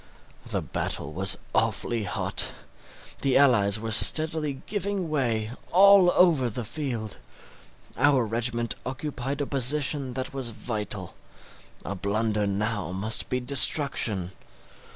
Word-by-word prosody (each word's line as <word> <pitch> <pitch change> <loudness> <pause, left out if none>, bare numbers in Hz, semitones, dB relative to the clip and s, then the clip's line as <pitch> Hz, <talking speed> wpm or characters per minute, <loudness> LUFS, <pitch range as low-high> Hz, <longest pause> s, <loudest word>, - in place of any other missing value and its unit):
The - - -3
battle - - -5
was - - +2 0.2
awfully 115 -3 -2
hot; 90 - +1 0.7
the 135 -2 +1
allies 110 -7 +2
were 110 0 -6
steadily 155 +4 +5
giving 200 -4 -4
way 115 -7 -2 0.2
all 195 0 +5
over 160 -9 +2
the 120 +2 -6
field. 115 -6 -6 0.8
Our 140 -4 +2
regiment 115 0 0
occupied 135 +1 -6
a - - -2
position 135 0 -1
that 130 0 -5
was 135 -3 -3
vital; 105 -4 -7 0.7
a - - -4
blunder 105 +2 -2
now 105 +1 -3
must 100 +4 0
be 125 - -2
destruction. 125 - +3
125 Hz, 115 wpm, -25 LUFS, 110-145 Hz, 0.8 s, steadily